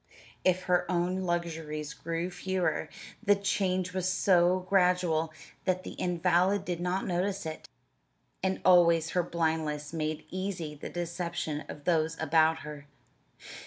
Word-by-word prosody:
If 185 0 +2
her 180 -1 +1
own 180 +1 0
luxuries 160 -3 -3
grew 165 +2 -3
fewer, 185 0 -1 0.3
the 205 -2 +4
change 185 -2 0
was 185 -1 0
so 185 -1 +3
gradual 180 -4 +2 0.3
that 185 -1 +1
the - - -6
invalid 180 +2 +1
did 175 -3 -2
not 180 +2 -1
notice 190 +1 -1
it, 155 0 -6 0.7
and 190 0 -1
always 170 -2 +5
her 180 - +2
blindness 160 -3 -1
made 155 -1 -2
easy 185 -5 -3
the 150 - -7
deception 170 -3 -3
of 145 - -8
those 165 -1 +1
about 160 +1 +3
her. 150 -1 -9
175 Hz, 130 wpm, -30 LUFS, 160-185 Hz, 0.7 s, always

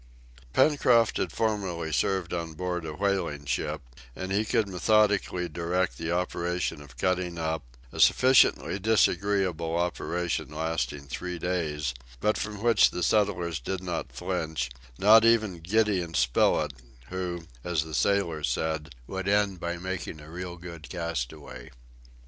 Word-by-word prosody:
Pencroft 125 - +4
had - - -1
formerly 95 -8 -1
served 95 0 0
on 85 -2 -3
board 90 +1 -3
a 75 - -5
whaling 90 -6 -1
ship, 75 +3 -2 0.3
and 95 +1 -5
he 100 +2 +2
could 110 -1 +1
methodically 100 -1 +2
direct 85 +3 -1
the 85 0 -2
operation 90 -2 -1
of 65 -4 -14
cutting 90 +2 0
up, 80 -1 -2 0.3
a - - -8
sufficiently 130 -5 +5
disagreeable 95 -5 +1
operation 85 0 -1
lasting 80 -1 -2
three 90 +6 -5
days, 80 -6 -2 0.3
but 105 +9 +2
from 105 0 -4
which 115 -4 +5
the 90 - -3
settlers 90 -6 +1
did 95 +9 -4
not 90 -2 -3
flinch, 80 -6 -3 0.3
not 110 +3 +7
even 110 -6 +3
Gideon 95 -2 +1
Spilett, 60 -2 +2 0.4
who, 90 -2 -4 0.2
as 85 -3 0
the 80 -1 -9
sailor 85 -6 +1
said, 75 +2 -2
would 95 +6 -4
end 100 -2 +2
by 85 +1 -3
making 90 -3 -5
a 75 +1 -12
"real 90 0 -6
good 85 -2 -10
castaway." 85 -9 -5
90 Hz, 135 wpm, -28 LUFS, 80-100 Hz, 0.4 s, not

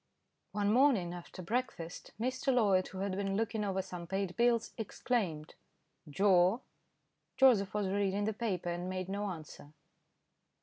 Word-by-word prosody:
One 205 0 +1
morning 235 -10 +4
after 180 +1 -9
breakfast, 180 -5 -3
Mr. 260 +3 0
Loyd, 200 -7 +3
who 190 - -7
had 200 0 -1
been 195 0 -1
looking 225 -1 -1
over 190 -2 -1
some 180 -2 -7
paid 190 0 -2
bills, 235 -1 +2
exclaimed, 200 -8 -2 0.6
"Joe." 190 - +4 0.8
Joseph 220 -8 +5
was 205 -2 0
reading 200 +1 0
the 220 - 0
paper, 195 -6 -2
and 175 +1 -3
made 185 0 -3
no 200 +1 -2
answer. 155 -4 -8
195 Hz, 140 wpm, -33 LUFS, 180-225 Hz, 0.8 s, Joseph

